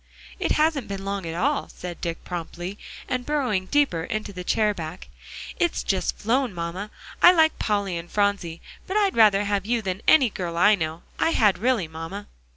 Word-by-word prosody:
"It - - +1
hasn't 305 -5 +1
been 195 -1 -5
long 195 -3 -3
at 165 - -4
all," 280 - 0
said 175 -2 -8
Dick 170 -1 -4
promptly, 175 +2 -6 0.3
and 255 -1 -2
burrowing 245 -10 -1
deeper 275 - +2
into 215 +2 -4
the 180 -1 -6
chair 210 +3 +2
back; 170 -1 -7 0.5
"it's 345 -1 +1
just 190 -2 -1
flown, 240 -1 0
mamma. 170 +5 -4 0.3
I 355 - +10
like 320 -3 +3
Polly 200 -5 0
and 170 +1 -10
Phronsie; 200 -5 0 0.3
but 380 - -1
I'd 400 -3 +2
rather 210 -3 +5
have 200 -1 -1
you 235 -1 0
than 190 +1 -3
any 265 -8 +6
girl 170 -3 -4
I 205 +5 +6
know; 160 -3 -2 0.2
I 325 - +3
had 210 -4 +3
really, 230 -6 +1
mamma." 165 +6 -7
200 Hz, 185 wpm, -24 LUFS, 175-245 Hz, 0.5 s, I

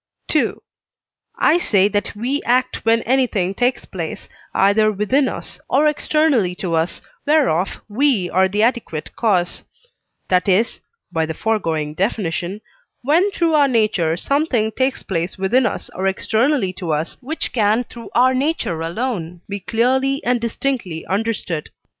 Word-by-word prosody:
II. - - +3 0.8
I 335 - +4
say 200 - +3
that 205 0 -2
we 255 +7 -1
act 250 +1 +1
when 230 0 +3
anything 230 -7 +1
takes 245 +5 0
place, 170 -5 -6 0.2
either 215 +2 +3
within 235 +7 +1
us - - -6
or 290 +3 +3
externally 300 - +2
to 180 -2 -3
us, 165 +2 -1 0.2
whereof 270 - +2
we 225 -3 +1
are 190 +1 +3
the 205 +3 0
adequate 225 - -1
cause; 185 -6 +1 0.7
that 185 +1 +2
is 215 +6 +2 0.3
(by 160 -1 0
the 160 - -4
foregoing 160 -9 -1
definition) 190 +1 -2 0.4
when 330 +9 +3
through 335 -5 0
our 290 -2 +5
nature 215 -9 +1
something 265 - +1
takes 260 +3 -1
place 170 -1 -3
within 235 +7 +2
us - - -5
or 190 +1 -1
externally 220 +2 +1
to 175 -3 -4
us, 155 +2 -2
which 305 +6 -3
can 220 +1 +2
through 235 -1 -11
our 255 +2 +5
nature 260 - -1
alone 175 -2 -3
be 200 0 -4
clearly 260 +7 +1
and 245 -1 +1
distinctly 230 -8 -2
understood. 195 -6 -2
215 Hz, 145 wpm, -20 LUFS, 185-260 Hz, 0.8 s, our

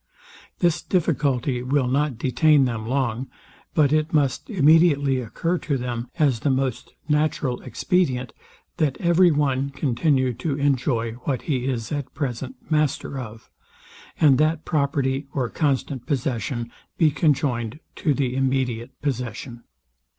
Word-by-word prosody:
This 170 -2 +1
difficulty 135 -7 0
will 130 +1 +1
not 140 0 0
detain 140 +3 +3
them 115 -3 -3
long; 130 -1 -1 0.5
but 150 -2 +4
it 155 0 +1
must 140 -4 0
immediately 150 - +4
occur 165 +9 -2
to 140 -3 -1
them, 120 -1 -4
as 140 -8 +2
the 145 - 0
most 130 -2 -2
natural 150 -4 0
expedient, 130 - 0 0.4
that 150 -6 +1
every 175 +1 +4
one 140 -3 +1
continue 130 -1 +1
to 135 +5 -3
enjoy 130 -5 +1
what 135 -4 -1
he 130 -4 -1
is 120 -4 -3
at 145 -3 -4
present 130 -3 -4
master 150 -3 0
of, 110 -2 -9 0.7
and 140 -5 +5
that 155 +1 +1
property 140 -2 0
or 125 -4 0
constant 140 -4 -1
possession 120 -3 -2 0.3
be 160 -2 +4
conjoined 140 -5 0 0.2
to 150 -5 +1
the 130 -2 -1
immediate 130 -2 -1
possession. 125 -3 -4
135 Hz, 130 wpm, -23 LUFS, 125-150 Hz, 0.7 s, and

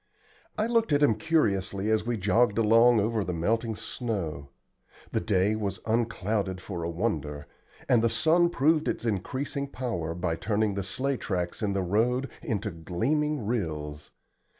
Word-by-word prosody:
I 215 - +1
looked 230 -3 +1
at 145 0 +4
him 140 - +5
curiously 105 - 0
as 110 0 +1
we 120 -1 0
jogged 105 +2 +2
along 115 +1 +5
over 110 +1 0
the 90 -2 -3
melting 110 +6 0
snow. 85 - -4 0.6
The - - +1
day 100 +2 +1
was 100 -3 -3
unclouded 110 -4 -1
for 90 -1 -6
a 85 - -2
wonder, 75 -6 -2 0.4
and 120 - +4
the 115 - +3
sun 170 +7 +3
proved 155 +1 +2
its - - -2
increasing 130 +7 -2
power 110 -12 -3
by 85 -2 -1
turning 105 +1 0
the 100 - -2
sleigh 130 +8 -1
tracks 90 -2 -3
in 105 -2 0
the 95 -1 0
road 120 +7 +1
into 105 -1 -2
gleaming 120 - -1
rills. 75 -9 -3
110 Hz, 155 wpm, -28 LUFS, 95-125 Hz, 0.6 s, him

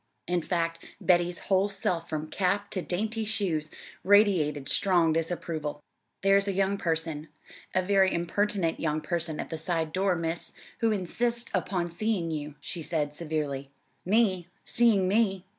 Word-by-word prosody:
In 175 0 0
fact, 165 -1 -1 0.2
Betty's 175 -1 +2
whole 195 +1 +2
self 180 -4 -2
from 155 -1 -2
cap 200 +2 0
to 185 - -2
dainty 220 +6 -2
shoes 190 -8 -1 0.3
radiated 185 -9 +4
strong 175 -3 +4
disapproval. 160 -2 -2 0.4
"There's 195 0 +4
a 200 - 0
young 195 +1 +1
person 160 -2 -2 0.5
a 185 - +3
very 195 0 +4
impertinent 175 0 0
young 155 -1 0
person 160 -1 -2
at - - -5
the 160 - -3
side 160 -1 -1
door, 190 0 +2
Miss, 165 0 -3 0.3
who 230 -2 +2
insists 235 +5 -1
upon 180 -2 -1
seeing 180 -2 -1
you," 150 -1 -4
she 170 - -5
said 150 -2 -1
severely. 150 -4 -3 0.3
"Me? 190 -3 +2 0.2
Seeing 220 -6 +3
me? 195 -2 +2
175 Hz, 145 wpm, -28 LUFS, 160-200 Hz, 0.5 s, radiated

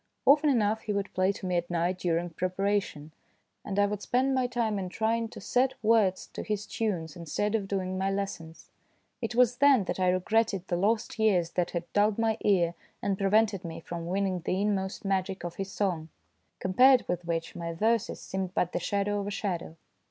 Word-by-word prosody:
Often 295 +2 +6
enough 220 -4 +2
he 215 - -3
would 200 -1 -3
play 185 +1 +2
to 195 - -8
me 180 -1 0
at 175 0 -2
night 175 +1 0
during 175 -1 -1
prepara 195 +4 0
tion, 150 -4 -10 0.5
and 200 -1 -4
I 205 - +5
would 205 0 -3
spend 260 +4 +1
my 260 -1 +1
time 230 -4 -1
in 185 -1 -4
trying 225 +3 0
to - - -10
set 250 +6 +1
words 215 -4 +3
to - - -5
his 210 -1 -3
tunes 185 -9 -3
instead 175 +5 -2
of 210 -3 0
doing 185 -1 -2
my 190 +1 +1
lessons. 195 -5 -5 0.5
It 230 0 -3
was 245 0 +4
then 275 -5 +5
that 190 - -4
I 185 -1 +3
regretted 195 +1 +1
the 175 - 0
lost 215 +5 0
years 185 -6 +2
that 180 -2 0
had 170 -1 -3
dulled 205 0 +3
my 225 -1 +1
ear 175 -4 +3 0.3
and 200 -1 0
prevented 205 0 +2
me 165 -2 -6
from 170 0 -6
winning 190 0 0
the 180 +2 -1
inmost 200 -1 -1
magic 190 -1 -1
of 175 -1 -6
his 195 0 -4
song, 175 -6 -1 0.5
compared 250 +7 +5
with 180 -1 -2
which 165 -1 -3
my 170 -1 -4
verses 220 +6 0
seemed 190 -1 -4
but 180 - +1
the - - -1
shadow 200 +3 -1
of 200 - -4
a - - -1
shadow. 185 -6 -3
195 Hz, 205 wpm, -29 LUFS, 180-220 Hz, 0.5 s, Often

